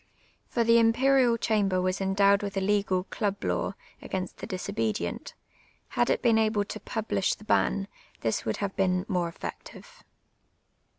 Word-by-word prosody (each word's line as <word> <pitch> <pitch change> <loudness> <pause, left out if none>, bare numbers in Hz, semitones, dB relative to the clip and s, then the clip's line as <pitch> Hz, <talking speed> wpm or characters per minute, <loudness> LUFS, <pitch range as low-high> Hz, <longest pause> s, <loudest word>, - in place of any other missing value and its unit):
For 235 - 0
the 230 0 +5
Imperial 245 +1 +4
('hand)er 205 -5 +1
was 185 +1 -1
endowed 200 +1 +3
with 200 -1 -4
a - - +3
legal 195 -2 +1
club 200 0 -3
law 90 -1 -1 0.3
against 185 -1 -4
the - - -7
disobedient; 210 +2 -3 0.5
had - - +1
it - - +1
been 230 -2 +4
able 215 -2 +1
to 215 - -7
publish 215 -2 -1
the - - -16
ban, 200 -2 +1 0.3
this 115 -1 -1
would 110 - -2
have 195 - -6
been 185 -1 +1
more 180 -4 0
effective. - - -9
200 Hz, 155 wpm, -28 LUFS, 190-225 Hz, 0.5 s, the